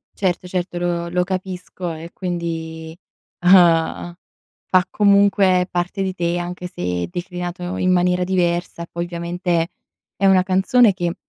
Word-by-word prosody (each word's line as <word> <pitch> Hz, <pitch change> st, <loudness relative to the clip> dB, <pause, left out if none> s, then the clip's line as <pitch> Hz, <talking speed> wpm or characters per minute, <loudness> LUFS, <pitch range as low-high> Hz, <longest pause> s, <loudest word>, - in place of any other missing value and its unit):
Certo, 180 Hz, -2 st, -1 dB
certo 180 Hz, -1 st, -3 dB
lo 175 Hz, -1 st, -2 dB
lo 180 Hz, +1 st, +1 dB
capisco 185 Hz, -1 st, -5 dB
e 165 Hz, +1 st, -8 dB
quindi, 165 Hz, -2 st, -5 dB, 0.4 s
ehm, 175 Hz, -2 st, +4 dB, 0.5 s
fa 185 Hz, -1 st, +3 dB
comunque 200 Hz, -3 st, +4 dB
parte 180 Hz, +3 st, -2 dB
di 190 Hz, -1 st, -2 dB
te 175 Hz, -1 st, -1 dB
anche 180 Hz, +1 st, -5 dB
se, 90 Hz, -, -3 dB
declinato 175 Hz, 0 st, -5 dB
in 185 Hz, 0 st, +1 dB
maniera 180 Hz, 0 st, +2 dB
diversa 175 Hz, -2 st, -1 dB
e -, -, -9 dB
poi 170 Hz, 0 st, -3 dB
ovviamente, 170 Hz, 0 st, -2 dB, 0.5 s
è 195 Hz, -, +2 dB
una 185 Hz, -1 st, +5 dB
canzone 195 Hz, +4 st, +4 dB
che 175 Hz, -2 st, -2 dB
180 Hz, 140 wpm, -20 LUFS, 170-185 Hz, 0.5 s, una